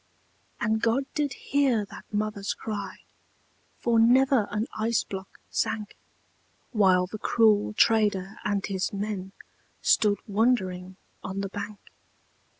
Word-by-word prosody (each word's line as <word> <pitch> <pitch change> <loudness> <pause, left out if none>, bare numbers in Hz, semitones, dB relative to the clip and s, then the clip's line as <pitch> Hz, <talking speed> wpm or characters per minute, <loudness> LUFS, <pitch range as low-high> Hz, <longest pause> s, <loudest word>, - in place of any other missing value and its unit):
And 220 +1 0
God 235 +4 +2
did 290 -2 -1
hear 265 -7 +1
that - - -13
mother's 210 -1 -2
cry, 200 -3 -5 0.8
For 235 -1 +2
never 250 -1 +4
an 210 +2 -1
ice 225 +1 +1
block 190 0 -8
sank; 210 -2 -2 0.8
While 190 -5 +4
the 210 +4 -8
cruel 215 -2 +3
trader 210 -3 +2
and 200 -1 0
his 190 -2 -2
men 200 -2 -4 0.5
Stood 205 -1 +4
wondering 190 -4 0 0.3
on 195 +1 -4
the 195 - -3
bank. 205 +1 -6
210 Hz, 120 wpm, -27 LUFS, 195-225 Hz, 0.8 s, never